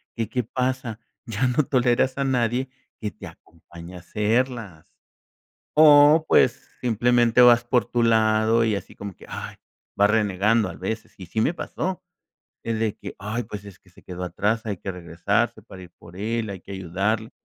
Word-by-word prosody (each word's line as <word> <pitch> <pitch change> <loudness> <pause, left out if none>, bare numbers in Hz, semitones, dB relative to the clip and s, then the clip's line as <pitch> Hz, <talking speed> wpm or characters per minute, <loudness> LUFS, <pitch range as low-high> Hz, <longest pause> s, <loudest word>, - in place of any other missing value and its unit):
que, 115 -2 -3
¿qué 125 0 -1
pasa? 125 -1 -3 0.3
Ya 115 +2 -1
no 125 +4 +2
toleras 130 +1 +1
a - - +1
nadie 125 0 0 0.3
que 105 - -2
te - - -12
acompañe 85 +1 -13
a - - -8
hacerlas. 105 -2 -2 0.8
O, 150 +1 +7
pues, 125 - +3
simplemente 120 0 +3
vas 120 -1 +7
por 120 0 +1
tu 120 0 -1
lado 110 0 +3
y 110 -2 +1
así 100 - -8
como 100 -2 -8
que, - - -15
ay, - - -7 0.4
vas 100 +1 +4
renegando 105 0 +2
a - - -7
veces, 110 +4 -5
y 90 - -9
sí 110 - -1
me 145 - +1
pasó. 185 +1 -4 0.6
Es 115 -1 -2
de 110 -2 -1
que: - - -9
"Ay, 110 +5 -4
pues 105 -2 -8
es 100 -1 -12
que 95 - -25
se 90 - -20
quedó 90 0 -7
atrás, 105 +6 -1
hay 100 -3 -3
que 95 - -5
regresarse 85 -2 -2
para 95 - -12
ir 90 -2 -13
por 85 +1 -15
él, 110 +3 -2
hay 95 - -7
que 100 - -12
ayudarle, 100 +5 -2
110 Hz, 180 wpm, -24 LUFS, 100-120 Hz, 0.8 s, O